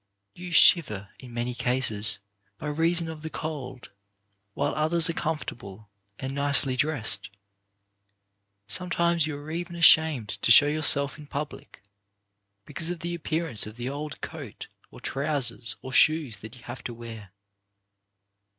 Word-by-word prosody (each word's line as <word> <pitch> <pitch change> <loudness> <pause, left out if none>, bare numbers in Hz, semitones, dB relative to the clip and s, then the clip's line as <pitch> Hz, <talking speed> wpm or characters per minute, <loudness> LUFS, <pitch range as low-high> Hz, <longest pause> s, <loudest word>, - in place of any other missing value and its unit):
You 180 0 -9
shiver, 110 - +5
in 125 -2 -12
many 120 +1 -2
cases, 115 -4 +1 0.4
by - - -9
reason 165 +3 +1
of 160 -1 -8
the 160 - -6
cold, 135 -7 -7 0.6
while 145 +1 -1
others 160 +2 +3
are - - -6
comfortable 110 - -6 0.3
and 135 0 -5
nicely 140 -2 +1
dressed. 125 -8 0 1.4
Sometimes 170 - 0
you 150 -2 -5
are 145 +2 -9
even 175 +1 -5
ashamed 160 -8 +5
to - - +2
show 145 - +9
your 150 +2 -1
self 140 -1 +3
in 150 - -12
public, 145 -7 -7 0.8
because 170 0 -3
of 175 -2 -5
the 170 0 -4
appearance 160 -8 -1
of 110 - -10
the 120 - -8
54 135 +3 -4
CHARACTER - - -8
BUILDING - - -8
old - - -15
coat, - - -10 0.2
or - - -14
trousers, 125 -7 0
or 130 - -8
shoes 150 -10 +3
that 110 +3 -11
you 125 - -17
have 120 +1 -9
to 120 - -5
wear. 115 -4 -10
145 Hz, 155 wpm, -26 LUFS, 120-160 Hz, 1.4 s, show